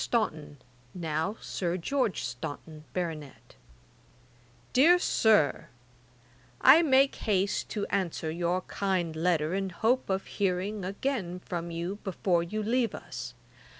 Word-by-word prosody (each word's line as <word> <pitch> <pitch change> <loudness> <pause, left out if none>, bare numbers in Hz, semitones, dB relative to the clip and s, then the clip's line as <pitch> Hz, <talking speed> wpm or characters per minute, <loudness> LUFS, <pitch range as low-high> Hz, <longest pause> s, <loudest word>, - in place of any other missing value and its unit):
STAUNTON, 155 -11 -1 0.4
(NOW 165 +4 -2
SIR 175 -1 -2
GEORGE 245 +3 -1
STAUNTON, 150 +5 -7
BARONET.) 160 - -5 1.2
'DEAR 325 +8 +6
SIR, 215 - +3 0.9
'I 280 +6 +8
make 275 -3 +4
haste 200 -2 0
to 205 -2 -2
answer 170 -4 -1
your 175 +2 0
kind 185 -5 -2
letter, 160 -1 +1
in 195 0 -1
hope 225 +8 0
of 190 0 -1
hearing 195 +1 -1
again 195 -2 -3
from 170 -1 -4
you 170 +4 -4
before 185 -3 +1
you 210 +6 -3
leave 235 +2 +1
us. - - -7
185 Hz, 115 wpm, -29 LUFS, 170-215 Hz, 1.2 s, I